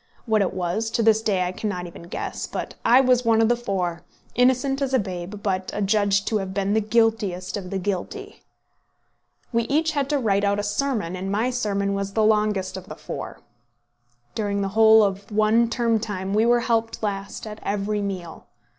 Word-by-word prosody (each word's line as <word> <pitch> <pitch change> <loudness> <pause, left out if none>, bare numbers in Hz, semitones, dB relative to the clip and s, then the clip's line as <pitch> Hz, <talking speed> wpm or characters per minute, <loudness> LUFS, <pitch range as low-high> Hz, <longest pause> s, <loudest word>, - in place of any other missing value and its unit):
What 220 -3 +2
it 195 - -1
was, 185 +5 -1
to 230 - +1
this 220 0 +4
day 195 -4 +1
I 180 - -2
cannot 185 -2 -4
even 170 0 -11
guess; - - -4
but - - -5
I 250 +3 +6
was 250 -1 +3
one 225 -1 +3
of 225 0 +4
the 240 - +4
four, 185 -7 -2 0.3
innocent 260 +2 +2
as 270 -1 +1
a - - +6
babe, 190 -1 -5
but 190 -2 -1
adjudged 200 -1 +1
to 220 - +1
have 190 -1 -5
been 200 0 0
the 220 - +3
guiltiest 215 -4 0
of 190 -3 -5
the 195 - -2
guilty. 205 - -4 1.1
We 230 0 +2
each 310 +4 +1
had 280 -2 -1
to 295 - +2
write 205 -6 +1
out 200 0 +2
a 205 - -1
sermon, 205 -4 -1
and 190 +1 -4
my 225 +5 +1
sermon 200 -5 -1
was 200 0 -3
the 220 - +2
longest 210 -3 +1
of 190 - -9
the - - -7
four. - - -7 0.9
During 200 -2 -1
the 195 - -1
whole 220 +1 +6
of 200 +1 -2
one 215 +2 +3
term 230 -2 +1
time 195 -3 -4
we 220 +2 +3
were 240 0 +4
helped 225 -1 -1
last 200 0 -4
at 215 0 -8
every 205 +1 -1
meal. 185 -5 -6
210 Hz, 200 wpm, -24 LUFS, 195-230 Hz, 1.1 s, I